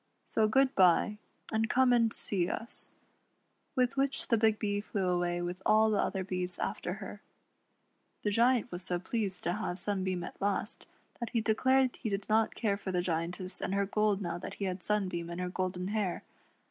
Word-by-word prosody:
So 220 -1 +2
good 265 +4 +3
bye, 190 +3 +4 0.3
and 220 0 +1
come 255 -1 +4
and 230 -2 +4
see 185 -5 0
us," 230 - -5 0.8
With 250 0 +1
which 275 0 0
the 230 - +4
Big 220 -1 +4
Bee 205 -1 -1
flew 200 -2 -2
away 175 -1 0
with 180 +1 -4
all 220 +2 +4
the 210 - +2
other 190 -1 -1
bees 180 -1 -1
after - - -2
her. - - -8 1.0
The 210 - +1
Giant 240 +2 +3
was 175 - -5
so 180 -1 -1
pleased 190 0 -3
to 175 - 0
have 195 -3 -3
Sunbeam 190 -3 -2
at - - -9
last, 205 +2 -2 0.3
that 235 - -3
he 230 - +2
declared 260 +4 +2
he 220 - -3
did 200 0 -3
not 220 +1 +2
care 205 -4 0
for 195 -1 -5
the 180 -1 0
Giantess 180 +2 -1
and 195 - -1
her 200 0 +2
gold 205 0 +1
now 170 -1 -3
that - - -7
he 200 - -3
had 185 0 -3
Sunbeam 185 -5 -1
and 170 +1 -5
her 180 0 -2
golden 185 0 -2
hair. 205 -4 -1
200 Hz, 195 wpm, -31 LUFS, 180-220 Hz, 1.0 s, bye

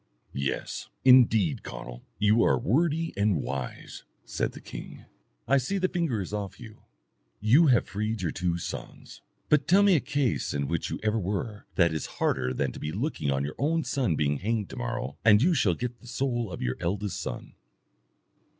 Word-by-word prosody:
"Yes, 70 0 -3 0.2
indeed, 115 - +5
Conall, - - -8 0.2
you 105 +2 +4
are - - +4
wordy 165 +6 +1
and 100 -4 +2
wise," 70 -2 -5 0.2
said - - -2
the - - -9
king. - - -9 0.4
"I 140 - +4
see 195 +10 -2
the 185 -1 +2
finger 165 - -1
is 95 - -6
off 100 -2 -4
you. 110 -3 -12 0.6
You 130 +11 +5
have 125 -4 +4
freed 110 0 -3
your 85 - 0
two 90 -2 -1
sons, 85 - -8 0.3
but 150 -2 +3
tell 195 +3 +6
me 200 -3 +5
a - - +4
case 135 - -1
in 70 -1 -1
which 85 +1 -2
you - - -4
ever 110 +1 +1
were 105 +2 -4
that 85 -3 +3
is 80 - -3
harder 65 - +1
than 65 +1 -1
to - - -9
be 75 - -3
looking 115 - -2
on 70 0 0
your 155 - -1
son 125 - 0
being 75 -1 +1
hanged 105 +3 -2
to - - -7
morrow, 125 0 -4
and 105 -2 +7
you 175 +3 +4
shall 105 - +2
get 120 +2 -5
the 125 - -16
soul 120 -4 -2
of - - -5
your 60 - -1
eldest 95 +3 -2
son." - - -6
110 Hz, 185 wpm, -27 LUFS, 85-130 Hz, 0.6 s, and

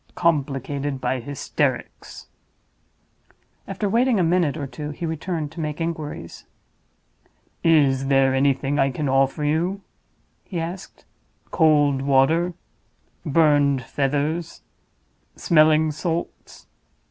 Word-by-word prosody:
"Complicated 140 -3 -1
by 130 0 -1
hysterics." 140 +3 -3 1.4
After 195 +2 -3
waiting 235 +2 +2
a - - +3
minute 165 -3 +1
or 145 - -4
two 150 +2 -7
he 150 +3 -5
returned 160 -1 -4
to 165 - -10
make 150 -1 -4
inquiries. 155 - -5 1.2
"Is 140 -5 +3
there 135 -1 +3
anything 135 +1 +1
I 135 0 +3
can 145 +3 -3
offer 135 +2 +1
you?" 170 +6 0 0.6
he 180 - -5
asked. 175 +3 -7 0.5
"Cold 145 -4 +3
water? 140 +6 +2 0.7
burned 145 -3 +3
feathers? 145 +6 -2 0.7
smelling 155 -1 +3
salts? 165 +2 -5
150 Hz, 100 wpm, -22 LUFS, 135-165 Hz, 1.4 s, a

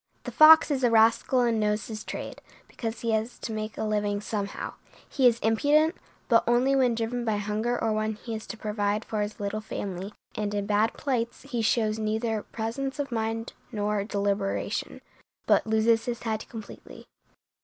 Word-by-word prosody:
The - - -5
fox 315 0 +8
is 270 -2 0
a 245 - +5
rascal 230 +3 +4
and 235 -2 +2
knows 210 0 0
his 215 -1 -6
trade, - - -6 0.3
because 225 -1 -5
he 230 - 0
has 220 +2 -1
to - - -6
make 215 -1 -4
a - - -2
living 210 -1 0
somehow. 205 -1 -4 0.3
He 265 -3 +3
is 235 -1 +3
impudent, 295 +8 +3 0.3
but 230 -2 +5
only 250 +3 +3
when 250 -3 +3
driven 235 +2 -2
by 220 -3 0
hunger 215 +4 -1
or 225 -1 0
when 215 0 -1
he 225 +2 -7
has 220 0 -6
to 230 - -7
provide 210 0 -1
for 215 -1 -2
his 205 +2 -4
little 205 +1 -3
family; 195 -2 -5 0.2
and 205 -1 -2
in 205 -1 -1
bad 210 +2 +2
plights 240 -5 -2
he 255 -4 -3
shows 220 -1 +1
neither 220 0 -1
presence 235 +6 -4
of 285 -3 -3
mind 225 0 -2 0.2
nor 210 -2 -1
deliberation, 200 -1 -2 0.4
but - - +3
loses 220 +1 +3
his 240 -1 -4
head 220 -2 -3
completely. 220 -3 -10
220 Hz, 180 wpm, -27 LUFS, 210-235 Hz, 0.4 s, fox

